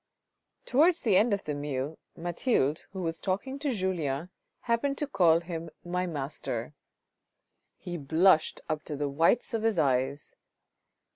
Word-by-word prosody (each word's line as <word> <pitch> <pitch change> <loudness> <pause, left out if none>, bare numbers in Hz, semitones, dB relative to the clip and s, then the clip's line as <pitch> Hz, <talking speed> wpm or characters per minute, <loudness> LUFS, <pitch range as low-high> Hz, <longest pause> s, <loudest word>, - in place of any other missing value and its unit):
Towards 325 +6 +4
the 215 -5 +3
end 215 +5 +4
of 200 -1 0
the 150 - -3
meal, 145 +1 -3 0.2
Mathilde, 170 - 0
who 190 -1 -5
was 165 -1 -3
talking 235 +9 -2
to 290 0 -1
Julien, 180 - -1 0.3
happened 260 +4 0
to 295 - 0
call 170 - +4
him 170 -1 -6
" - - -39
My 180 0 +1
Master." 140 -5 -4 1.0
He 175 -1 -6
blushed 160 +3 +3
up 155 -1 -1
to 150 - -4
the 145 0 -1
whites 165 - +2
of 225 - 0
his 225 -3 +1
eyes. 135 -1 0
170 Hz, 150 wpm, -29 LUFS, 150-215 Hz, 1.0 s, Towards